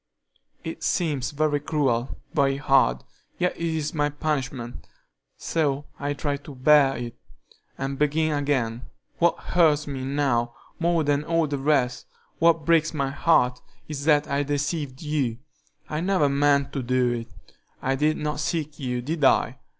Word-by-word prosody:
It - - -6
seems 145 -7 0
very 145 0 0
cruel, 135 -5 -1 0.2
very 135 -1 +2
hard, 135 - +3 0.3
yet 180 0 0
it - - -11
is 160 -1 -1
my 145 -2 +1
punishment, 135 -5 -4 0.5
so 145 -3 -1
I 145 0 -1
try 145 0 -2
to 145 0 -11
bear 135 +1 +5
it, 120 -1 -6 0.6
and 135 0 -4
begin 155 +2 +2
again. 130 -5 0 0.4
What 170 0 +3
hurts 155 -4 +2
me 135 -2 -5
now 130 -4 0 0.2
more 170 -1 +2
than 145 0 +1
all 165 0 +1
the 145 -2 -3
rest, 135 -3 +1 0.3
what 165 -2 +3
breaks 165 -1 +3
my 140 -2 -1
heart, 125 -5 +2 0.3
is 145 -2 -5
that 150 -1 +4
I 140 +1 0
deceived 145 0 -2
you. 140 -7 -1 0.5
I 150 - -3
never 185 -5 +2
meant 140 0 +2
to 135 - -2
do 125 0 +1
it. 115 -1 -3 0.5
I 135 - 0
did 150 +3 +1
not 150 -1 -3
seek 155 0 -2
you, 125 -3 -2
did 155 +3 -3
I? 135 - +3
145 Hz, 155 wpm, -25 LUFS, 135-155 Hz, 0.6 s, bear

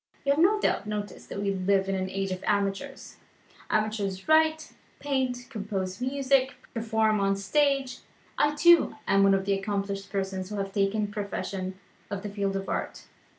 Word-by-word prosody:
You 280 - +3
have 290 +3 +2
no 420 +5 +4
doubt 210 - 0
noticed 210 -1 -5
that - - -5
we 200 -1 0
live 190 +1 +1
in 195 - 0
an 190 0 -1
age 195 0 -2
of 185 0 -4
amateurs. 205 +7 -2 0.5
Amateurs 210 -3 -1
write, 315 0 +3 0.3
paint, 260 -3 -1
compose 200 -3 -4
music, 265 0 +1 0.2
perform 220 -2 +1
on 195 0 +2
the - - -7
stage. 275 +3 +1 0.4
I, 295 0 +2
too, 340 +3 +5
am 195 0 +4
one 195 0 +5
of 195 0 -1
the 200 - +2
accomplished 195 0 -3
persons 190 -2 -3
who 210 - -5
have 195 -1 -3
taken 205 +1 0
possession 190 -2 -4 0.3
of 200 -1 -4
the 205 - -4
field 200 -1 -2
of 195 0 -3
Art. - - -3
205 Hz, 175 wpm, -27 LUFS, 195-260 Hz, 0.5 s, too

